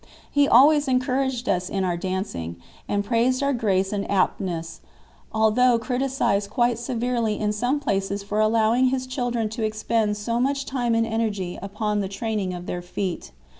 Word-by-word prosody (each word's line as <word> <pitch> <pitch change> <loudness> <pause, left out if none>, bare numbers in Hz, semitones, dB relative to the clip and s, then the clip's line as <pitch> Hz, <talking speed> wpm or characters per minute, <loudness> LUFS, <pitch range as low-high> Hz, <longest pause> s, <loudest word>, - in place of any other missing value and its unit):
He 285 -1 +4
always 290 +4 +6
encouraged 255 -1 0
us 180 -1 0
in 195 -1 -1
our 180 -2 0
dancing, 180 - -4 0.3
and 205 0 0
praised 245 +4 +1
our 280 0 +2
grace 195 -5 +1
and 200 -1 -3
aptness, 175 -4 -1 0.5
although 225 +3 +4
criticized 245 -4 0
quite 240 +1 +1
severely 235 -2 -1
in 210 -1 0
some 245 +7 0
places 200 -5 -1
for 205 +1 -2
allowing 225 +3 +3
his 255 0 -1
children 245 -3 -1
to 220 +1 -4
expend 215 0 0
so 230 +3 -2
much 275 +2 0
time 245 -4 0
and 230 0 +2
energy 215 -5 -2
upon 210 +2 -2
the 195 -2 -2
training 200 -1 -2
of 175 -1 -6
their 180 - -4
feet. 175 - -4
220 Hz, 165 wpm, -24 LUFS, 200-250 Hz, 0.5 s, always